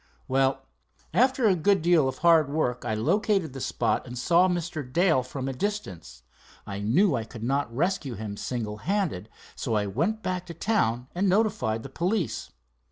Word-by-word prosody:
"Well, 135 0 +1 0.5
after 260 0 +3
a 205 - +5
good 190 +1 +2
deal 170 -5 +4
of 130 - -3
hard 165 -4 +4
work 125 -5 -1
I 110 - -1
located 180 - +1
the 135 - -7
spot - - -1
and 125 0 -7
saw 175 +8 +4
Mr. 170 -3 -2
Dale 170 -3 +3
from 130 +1 -5
a 135 - -2
distance. 95 - -5 0.4
I 100 0 -5
knew 140 - +3
I 115 -3 -1
could 115 0 -10
not 135 +1 0
rescue 145 -1 -1
him 105 0 -5
single 105 -1 -4
handed, 160 - -2 0.3
so 115 -4 -2
I 105 -1 +1
went 170 - -1
back 180 -1 -3
to 170 - -8
town 125 - 0
and 190 +2 +1
notified 190 - +1
the 135 - -8
police. 175 - -2
150 Hz, 175 wpm, -26 LUFS, 120-185 Hz, 0.5 s, a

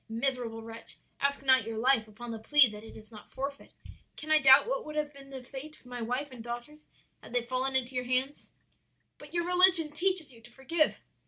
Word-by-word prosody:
Miserable 230 -1 -3
wretch, 225 0 -10 0.2
ask 280 0 -1
not 260 -2 +4
your 225 +1 -6
life 235 -1 +2
upon 230 +3 -10
the 225 - -6
plea 290 +4 +6
that 210 -1 -9
it 225 - -12
is 220 +1 -16
not 215 - -14
forfeit. 275 +1 -7 0.5
Can 310 - -6
I 310 - +6
doubt 270 -1 +7
what - - -2
would 305 - -9
have 300 -1 -3
been 275 -1 -14
the 265 -2 -9
fate 280 +4 -10
of - - -29
my 245 -1 -7
wife 250 +5 -3
and 245 -3 -10
daughters 240 +6 -9 0.3
had - - -13
they 245 -1 0
fallen 260 +2 -2
into 260 0 -1
your 250 0 -3
hands?' 255 +3 -1 0.7
"'But 295 +3 -13
your 345 0 0
religion 360 -3 +5
teaches 345 -2 0
you 230 - -17
to 240 - -16
forgive.' 305 +5 -1
265 Hz, 220 wpm, -29 LUFS, 240-295 Hz, 0.7 s, doubt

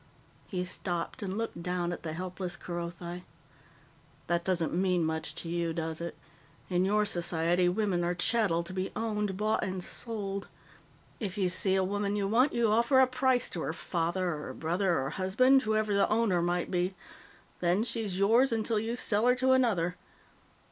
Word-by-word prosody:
He 180 -2 -3
stopped 175 0 -3
and 195 0 -3
looked 225 -6 -4
down 175 0 -1
at - - -7
the 160 -2 -5
helpless 180 +1 -4
Kerothi. 175 0 -6 1.0
"That 170 0 0
doesn't 170 -3 0
mean 180 -1 +1
much 160 0 -3
to - - -5
you, 170 -1 -1
does 160 -1 -3
it? 170 - -5 0.5
In 180 +1 +2
your 210 +2 +2
society, 175 -1 +2
women 185 -2 0
are 175 +1 0
chattel, 180 -3 +1
to 180 +2 -5
be 185 0 -3
owned, 210 -3 -2
bought, 215 +2 +1
and 185 -1 -3
sold. 200 -4 -3 0.7
If 205 -3 -4
you 190 -3 +1
see 190 +2 +3
a 190 - +2
woman 205 +1 -1
you 200 -1 0
want, 245 +7 +3
you 235 -2 +2
offer 235 +5 +4
a 260 - +7
price 255 -1 +1
to 170 - -4
her 160 - -2
father 170 +1 -1
or 150 -1 -6
brother 175 +2 0
or 135 +1 -2
husband 255 +10 +3
whoever 215 -2 0
the 200 - +3
owner 215 -5 +2
might 175 0 -1
be. 180 +1 0 0.6
Then 180 +4 +2
she's 215 -5 -2
yours 230 +7 +4
until 225 -1 0
you 225 +2 -2
sell 220 -1 +3
her 250 - +5
to 260 +1 +2
another. 200 -9 +2
190 Hz, 175 wpm, -30 LUFS, 175-215 Hz, 1.0 s, a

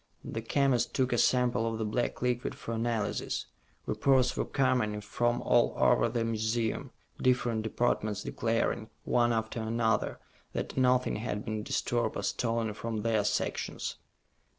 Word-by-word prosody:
The 115 - -4
chemist 135 +1 +1
took 130 -2 +2
a - - +2
sample 120 -3 +2
of 115 - -3
the 110 - -2
black 120 +3 -1
liquid 125 0 0
for 115 - -6
analysis. 115 -2 -1 0.4
Reports 130 -2 +3
were - - 0
coming 130 -6 +1
in 105 - -5
from 120 +3 0
all 120 -1 +3
over 120 -1 +4
the 115 0 -1
museum, 110 0 -1 0.3
different 125 -3 +2
departments 110 -2 0
declaring, 115 -1 -1
one 120 -1 +2
after 110 0 -1
another, 110 -1 0 0.4
that - - -3
nothing 125 -2 +3
had 105 -1 -3
been 110 0 -2
disturbed 120 +2 -1
or - - -3
stolen 115 -2 0
from 110 0 -4
their 110 -2 +2
sections. 105 - -2
115 Hz, 150 wpm, -30 LUFS, 110-120 Hz, 0.4 s, over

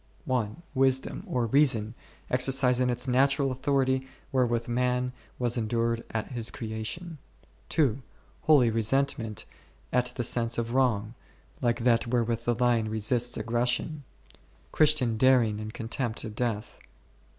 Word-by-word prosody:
1. 125 +4 -2
Wisdom 130 -1 +1
or 125 -2 0
Reason 115 -4 +2 0.4
exercising 125 -1 +3
its 125 +2 -1
natural 135 +2 +2
authority, 130 0 0 0.2
wherewith 120 -3 +1
man 125 +1 0 0.2
was 120 -1 0
endued 115 +1 -1
at 110 +2 -4
his 120 -2 -1
creation; 125 +9 -5 0.5
2. 135 -5 +1 0.4
Holy 140 -7 +5
Resentment 115 -1 0 0.5
at 125 0 +3
the 120 - -2
sense 115 0 0
of 115 0 -2
wrong, 115 -5 +1 0.5
like 120 -1 0
that 120 -1 +3
wherewith 115 -1 0
the 120 - +1
lion 120 -2 +1
resists 115 +3 0
aggression; 120 +6 -1 0.7
Christian 145 -7 +2
dar 130 +1 +5
ing 105 -1 -2
and 110 0 -6
contempt 115 0 -4
of 110 -2 -6
death; 115 -3 -3
3. - - -23
120 Hz, 130 wpm, -28 LUFS, 115-130 Hz, 0.7 s, Holy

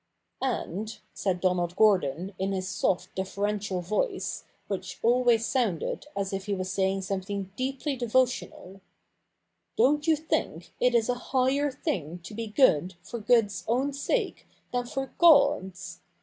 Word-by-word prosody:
' - - -53
And,' 220 -4 -3 0.2
said 185 -3 -1
Donald 180 -1 +1
Gordon 190 -3 +2
in 195 +1 0
his 185 -1 -2
soft 185 - -1
deferential 200 0 -2
voice, 210 - -2 0.2
which - - -4
always 240 -1 +4
sounded 235 - -1
as 195 -1 -2
if 195 0 -4
he 200 - 0
was 185 0 -3
saying 190 0 0
some 190 0 -2
thing 195 0 -5
deeply 270 +3 -2
devotional, 240 -5 -1 0.5
' - - -51
don't 295 +3 +3
you 320 - +5
think 285 - -3
it 250 -1 +3
is 225 -2 +3
a 250 - +2 0.2
higher 270 +2 +2
thing 180 - -3
to 210 - -9
be 225 +1 -4
good 190 - +3
for 235 - -6
good's 220 -2 +2
own 260 +5 +1
sake 400 - -2 0.2
than 245 -1 -1
for 270 +1 -4
God's? 275 - +4
210 Hz, 150 wpm, -28 LUFS, 190-255 Hz, 0.5 s, you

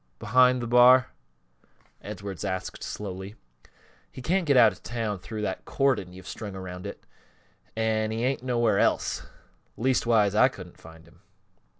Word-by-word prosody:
Behind 125 - +3
th' - - -3
bar?" 125 +2 +6 0.9
Edwards 100 -2 -7
asked, 95 -2 -4
slowly. 95 0 -6 0.8
"He - - -11
can't 180 +4 0
get 140 -2 +4
out 115 -3 +7
of 90 - -14
town 110 -4 -3
through 110 +3 -6
that - - -3
cordon 130 -10 0
you've 95 0 -13
got - - -8
strung 105 -3 -7
around 90 0 -7
it, 100 - -10 0.7
an' 110 -1 0
he 110 +1 -3
ain't 135 0 -1
nowhere 120 -5 +1
else. - - 0 0.5
Leastwise, 115 -4 +2
I 110 +4 +5
couldn't 95 -8 -11
find 80 0 -15
him." 85 +1 -22
110 Hz, 155 wpm, -26 LUFS, 95-125 Hz, 0.9 s, out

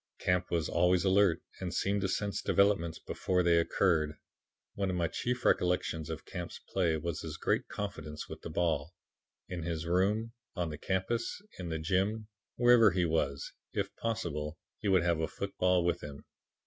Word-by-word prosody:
"Camp 90 0 +1
was 85 -3 0
always 90 0 +3
alert, 95 -3 +4 0.2
and 90 -2 -3
seemed 100 +3 0
to 95 - +1
sense 100 +1 -1
developments 95 -5 +2
before 90 -1 0
they 85 -1 +5
occurred. 80 -3 +2 0.6
One 100 -1 -1
of 90 - -1
my 85 -2 +1
chief 125 +8 -2
recollections 90 -3 +1
of - - -5
Camp's - - -6 0.2
play 85 -4 +2
was 85 0 -3
his 80 -2 -6
great - - 0
confidence 80 -7 -5
with - - -8
the - - -6
ball. 80 -1 0 0.5
In 90 -2 -4
his 80 -1 -3
room, 100 +6 +1 0.2
on 85 -4 -1
the 75 - -7
campus, 95 - -1 0.2
in 90 -2 -4
the 80 - -1
gym', 95 +7 0 0.3
wherever 120 -2 +7
he 90 -1 +1
was, 75 -4 -1 0.2
if - - -2
possible, 85 -10 -2 0.2
he 105 - -3
would 95 -3 +4
have 85 -2 +2
a 80 - 0
football 90 -1 +1
with 85 - +1
him. 70 -1 -9
90 Hz, 175 wpm, -32 LUFS, 80-100 Hz, 0.6 s, wherever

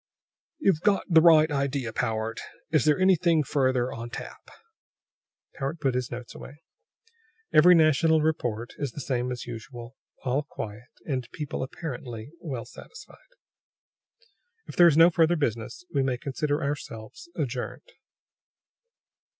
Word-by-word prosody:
"You've 195 - +2
got 205 0 +2
the 160 -3 +6
right 160 -2 +6
idea, 140 -4 -1
Powart. 110 -1 -2 0.3
Is 155 -1 +3
there 150 -1 +4
anything 175 -4 +3
further 130 -2 0
on 115 +1 -6
tap?" - - -9 1.0
Powart 140 +3 -4
put 135 -3 0
his 125 -1 -2
notes 120 0 -8
away. 145 +4 -12 0.9
"Every 175 +4 +8
national 160 0 +4
report 120 -7 -1
is 140 -5 -3
the - - -7
same 125 -2 -2
as 125 - -5
usual; 120 +1 -9 0.3
all 130 +3 +1
quiet, 115 -4 -8 0.2
and 130 -5 -3
people 150 -2 -4
apparently 130 -4 -6
well 130 -9 -5
satisfied. 450 - -13 1.5
"If - - -10
there 175 - +7
is 155 -3 +4
no 165 +2 +7
further 165 +1 +3
business, 115 -3 -3
we 140 - +2
may 130 -2 0
consider 145 +3 -2
ourselves 145 - -6
adjourned." 130 - -4
140 Hz, 135 wpm, -26 LUFS, 120-160 Hz, 1.5 s, Every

